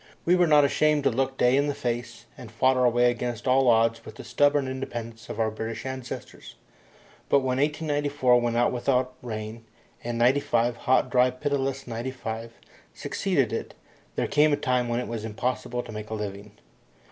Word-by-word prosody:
We 175 - +4
were 180 -1 +3
not 150 -2 +6
ashamed 150 +1 +2
to - - +3
look 135 +2 -1
day 125 +1 +4
in 140 +1 +2
the 145 - -2
face, 120 0 -4
and 120 - -11
fought 130 +3 +2
our 125 -1 +4
way 120 +1 +3
against 120 0 -4
all 130 +1 +4
odds 115 0 +3
with 110 - -11
the - - -9
stubborn 145 -1 +2
independence 120 -3 -6
of - - -6
our 110 -1 +1
British 110 +2 -5
ancestors. 130 -1 -7 0.7
But 140 - +4
when 130 0 -1
1894 145 -4 +1
went 120 -1 0
out 120 - +3
without 130 +1 0
rain, 110 -1 -6 0.4
and 120 0 -3
'95, 120 -1 +2
hot, 130 -1 +1
dry, 125 0 +4
pitiless 135 +1 -2
'95, 115 -1 -5 0.4
succeeded - - -1
it, - - -4 0.4
there - - 0
came 150 +1 +3
a 145 - +2
time 125 -2 0
when 120 0 0
it 125 - -4
was 115 -2 -5
impossible 120 +2 -3
to 120 - -10
make 105 0 -7
a 110 - -3
living. 100 0 -6
125 Hz, 180 wpm, -26 LUFS, 115-135 Hz, 0.7 s, not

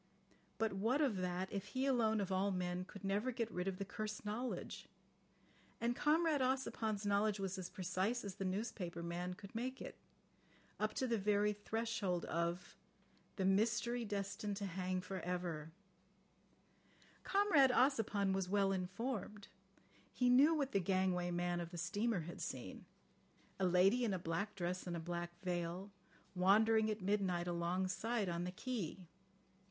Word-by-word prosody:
But 225 -2 +1
what 225 +8 +1
of 265 -10 +2
that 180 +1 -2
if 200 -2 -2
he 265 - +2
alone 225 -5 +3
of 195 -1 -2
all 190 +2 +2
men 180 -1 -1
could 200 +1 -11
never 205 +6 0
get 230 -2 -2
rid 180 +1 -2
of 190 -1 -1
the 195 - -3
cursed 215 +1 -5
knowledge? 230 +5 -4 0.9
And 235 +1 +1
Comrade 310 0 +3
Ossipon's 230 -5 0
knowledge 205 +1 +2
was 195 -1 -2
as 180 -1 -5
precise 190 +5 -1
as 200 - -4
the 195 - -5
newspaper 185 -3 -3
man 175 +1 -3
could 200 +1 -11
make 255 +3 -3
it—up 215 0 -8
to 260 - +1
the 235 -3 +1
very 210 +1 +3
threshold 205 -4 -1
of 170 +2 -2 0.6
the 190 - 0
"mystery 230 +4 +2
destined 200 -1 -3
to 200 - -3
hang 185 0 -2
for 190 +1 -5
ever... 170 -3 -3 0.7
." 200 - -31
Comrade 390 -10 +5
Ossipon 225 -7 +3
was 190 -1 -1
well 200 0 +3
informed. 200 +2 -3 0.6
He 250 -1 +3
knew 285 +6 +7
what 280 -3 0
the 195 - +3
gangway 185 -1 +1
man 175 0 0
of 170 -1 -4
the 175 - -8
steamer 205 +4 0
had 170 +2 -7
seen: 120 -8 -5 0.7
"A 190 - +3
lady 190 +7 +4
in 210 -5 +1
a - - 0
black 170 +5 -2
dress 180 0 -2
and 175 -1 -2
a - - -3
black 175 +1 -4
veil, 180 +2 -2 0.4
wandering 215 +4 +4
at 215 -1 -2
midnight 185 -3 +1
alongside, 185 +5 0
on 170 0 -1
the 180 - -3
quay. 215 -4 -3
195 Hz, 160 wpm, -38 LUFS, 180-225 Hz, 0.9 s, knew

